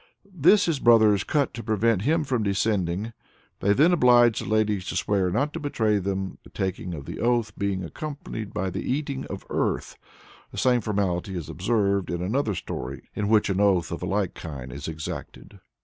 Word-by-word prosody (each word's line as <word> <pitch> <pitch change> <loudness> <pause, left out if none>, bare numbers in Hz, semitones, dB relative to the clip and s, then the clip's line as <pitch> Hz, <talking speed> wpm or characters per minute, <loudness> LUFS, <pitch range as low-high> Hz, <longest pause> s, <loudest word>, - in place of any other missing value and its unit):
This 185 +5 +5
his 160 -5 0
brothers 110 -5 +5
cut 145 -4 0
to 115 - -6
prevent 110 -2 +1
him 155 +7 +2
from 130 -5 -1
descending. 100 0 0 0.5
They 100 - +2
then 155 - +5
oblige 120 - +5
the - - -5
ladies 105 -3 +1
to - - -3
swear 95 -3 +1
not 140 +11 0
to 165 - -4
betray 110 -8 +1
them, 95 0 -3
the - - -15
taking 95 -2 -3
of 70 -3 -8
the - - -7
oath 115 -3 +1
being 100 -2 -2
accompanied 115 - -6
by 95 +1 -2
the - - -3
eating 140 0 -2
of 95 - -7
earth. - - -1 0.5
The - - -10
same 125 -2 +3
formality 95 -3 -1
is 80 -5 -6
observed 100 -1 0
in 85 +1 -2
another 110 +1 0
story - - -6
in 105 - -1
which 105 -2 +3
an 95 - 0
oath 95 -4 +2
of 85 - -4
a 90 - -3
like 100 -1 0
kind 65 -6 -8
is 70 +2 -6
exacted. 80 -1 -7
105 Hz, 190 wpm, -25 LUFS, 95-120 Hz, 0.5 s, This